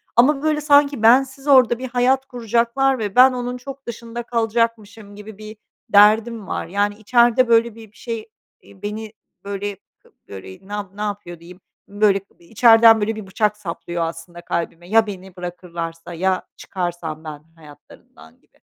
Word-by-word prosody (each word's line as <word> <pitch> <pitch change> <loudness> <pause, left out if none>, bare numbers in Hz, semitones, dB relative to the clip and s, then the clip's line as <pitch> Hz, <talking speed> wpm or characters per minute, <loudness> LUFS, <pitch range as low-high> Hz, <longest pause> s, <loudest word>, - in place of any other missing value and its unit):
ama 275 +4 +4
böyle 305 -1 0
sanki 285 -3 +3
bensiz 265 +4 +3
orada 255 -4 +5
bir 260 0 -6
hayat 255 +2 +1
kuracaklar 245 +1 0
ve 205 -3 -4
ben 255 +1 +7
onun 245 0 -4
çok 275 +1 -11
dışında 235 0 -7
kalacakmışım 225 -3 -2
gibi 210 0 -11
bir 215 0 -11 0.3
derdim 215 +1 +4
var. - - -4
Yani 205 +3 -1
içeride 240 +3 +3
böyle 230 -1 +2
bir 220 -2 -14
bir 210 - -24
şey, 230 -2 -6 0.3
eee, 195 - -19
beni 215 +1 -6 0.3
böyle 200 0 -5 0.5
böyle 95 - -11
ne - - -14
yapı 200 -1 -6
ne - - -6
yapıyor 205 -5 -5
diyeyim, 180 +2 -15 0.3
böyle 205 -1 +2 0.2
içeriden 225 +4 +5
böyle 220 +2 -1
bir 215 -2 -9
bıçak 210 +2 -1
saplıyor 170 -3 -5
aslında 165 +1 -7
kalbime, 170 0 -5
"Ya 225 +1 +4
beni 190 -2 -9
bırakırlarsa, 170 -2 -7
ya 185 +2 -1
çıkarsam 175 -4 -5
ben 150 -2 -9
hayatlarından." 145 - -18
gibi. - - -34
215 Hz, 155 wpm, -20 LUFS, 185-235 Hz, 0.5 s, ben